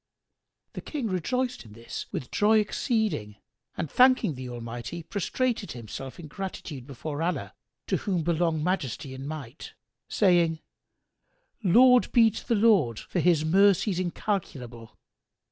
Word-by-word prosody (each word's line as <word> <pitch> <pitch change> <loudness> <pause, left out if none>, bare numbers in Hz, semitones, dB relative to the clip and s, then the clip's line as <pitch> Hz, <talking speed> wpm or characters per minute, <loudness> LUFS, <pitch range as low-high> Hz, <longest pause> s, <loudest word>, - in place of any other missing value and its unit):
The - - -6
King 275 -8 -4
rejoiced 250 +8 -1
in 110 -3 -14
this 115 +1 -7
with 125 - -5
joy 215 +1 +4
exceeding 210 - -1 0.4
and - - -2
thanking 255 - +4
the 130 -1 -7
Almighty 120 +7 -6
prostrated 220 +5 -2
himself 125 - -8
in 170 - -8
gratitude 150 -6 -7
before 145 +2 -5
Allah 175 +2 -2 0.3
(to - - 0
whom 185 -6 -1
belong 165 -1 0
Majesty 140 - -2
and 135 +1 -7
Might!), 145 -4 -8 0.4
saying, 175 -5 +3 1.0
"Laud 250 +6 +6
be 230 -2 +6
to - - -9
the 235 - +2
Lord 200 - +3
for 180 - -3
His 165 -3 +3
mercies 195 +2 +3
incalculable!" 135 - -4
170 Hz, 130 wpm, -27 LUFS, 135-210 Hz, 1.0 s, Laud